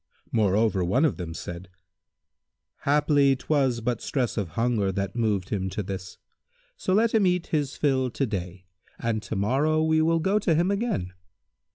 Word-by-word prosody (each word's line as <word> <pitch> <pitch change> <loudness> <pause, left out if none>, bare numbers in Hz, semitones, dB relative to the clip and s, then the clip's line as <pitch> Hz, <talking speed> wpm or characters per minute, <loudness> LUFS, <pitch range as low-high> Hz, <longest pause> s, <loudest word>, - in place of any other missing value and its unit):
Moreover 105 -2 +2
one 125 - +2
of 150 - 0
them 85 -3 -6
said, 90 +1 -7 1.2
"Haply 145 -1 +4
'twas 130 -3 0
but 120 +1 -2
stress 125 -5 -1
of 100 -5 -1
hunger 115 -4 +1
that 100 +1 -3
moved 105 -6 0
him 95 -2 -2
to 105 - -3
this; 95 -1 -7 0.6
so 345 - -3
let 225 +2 +3
him 215 -4 +4
eat 180 -1 +1
his 145 -3 0
fill 130 -3 +1
to 135 +3 -1
day, 90 -4 -5 0.3
and 115 -2 -1
to 110 - -5
morrow 140 +10 +1
we 160 0 +3
will 165 +1 +3
go 190 +6 +1
to 180 -6 +1
him 175 +5 +2
again." 200 - -2
125 Hz, 170 wpm, -26 LUFS, 100-155 Hz, 1.2 s, Haply